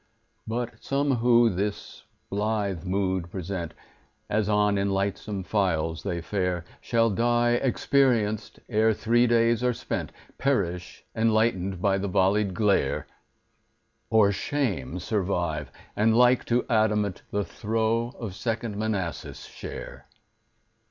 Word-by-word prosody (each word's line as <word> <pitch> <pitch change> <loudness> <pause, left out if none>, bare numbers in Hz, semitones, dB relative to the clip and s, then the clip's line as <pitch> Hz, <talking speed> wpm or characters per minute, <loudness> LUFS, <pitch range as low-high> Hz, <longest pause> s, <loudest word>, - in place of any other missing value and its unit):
But 120 +1 -4
some 140 -1 +1
who 120 0 +4
this 100 +3 -4 0.3
blithe 100 -3 -1
mood 95 -2 -1
present, 85 -2 -5 0.6
As 105 0 +1
on 105 -1 +3
in 100 0 0
lightsome 100 0 -2
files 80 -5 0
they 90 -4 -3
fare, 90 -1 -2 0.2
Shall 115 -1 +2
die 120 +3 +2
experienced 120 -3 +1
ere 110 -1 +3
three 120 +3 +3
days 115 0 +3
are 125 -1 +2
spent— - - -4 0.3
Perish, 90 -10 -1
enlightened 110 -5 +1
by 100 -1 +3
the 100 0 -2
vollied 95 +1 +2
glare; 105 -3 +1 1.0
Or 105 -3 +5
shame 100 - -2
survive, 90 - -2 0.2
and, 110 +2 +3
like 125 0 +5
to 120 +1 +1
adamant, 105 -4 +1
The 100 -1 -1
throe 115 +3 -1
of 110 -6 -5
Second 115 0 -3
Manassas 105 -6 -3
share. - - -9
105 Hz, 120 wpm, -26 LUFS, 95-115 Hz, 1.0 s, Or